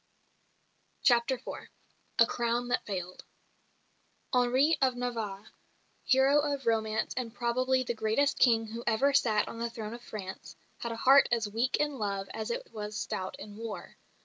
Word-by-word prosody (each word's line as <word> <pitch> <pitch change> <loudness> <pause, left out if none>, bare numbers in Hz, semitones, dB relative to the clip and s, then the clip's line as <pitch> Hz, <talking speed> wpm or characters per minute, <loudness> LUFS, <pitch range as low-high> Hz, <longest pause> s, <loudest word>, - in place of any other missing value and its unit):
CHAPTER 240 +1 +4
IV 255 - -8 0.5
A 230 - +7
CROWN 240 +1 -1
THAT 250 - +1
FAILED 185 -3 -5 1.1
Henri 255 +5 +4
of 260 -2 +3
Navarre, 225 -5 -4 0.5
hero 270 +2 +5
of 285 -3 -1
romance 220 -1 0
and 245 -3 -3
probably 255 +2 +1
the 240 - -2
greatest 230 +6 +1
King 225 -3 +4
who 230 +2 -7
ever 275 +6 +3
sat 220 -6 +3
on 230 - -7
the 235 0 -1
throne 225 -2 -6
of 240 - -8
France, 190 -5 -8 0.2
had 235 - -4
a - - -3
heart 270 +4 +6
as 230 -2 +1
weak 230 +5 0
in 295 -3 -1
love 200 -2 -2
as 220 - -4
it - - -3
was 210 0 -5
stout 185 0 -3
in 205 0 -10
war. 225 -1 -7
235 Hz, 160 wpm, -30 LUFS, 220-260 Hz, 1.1 s, A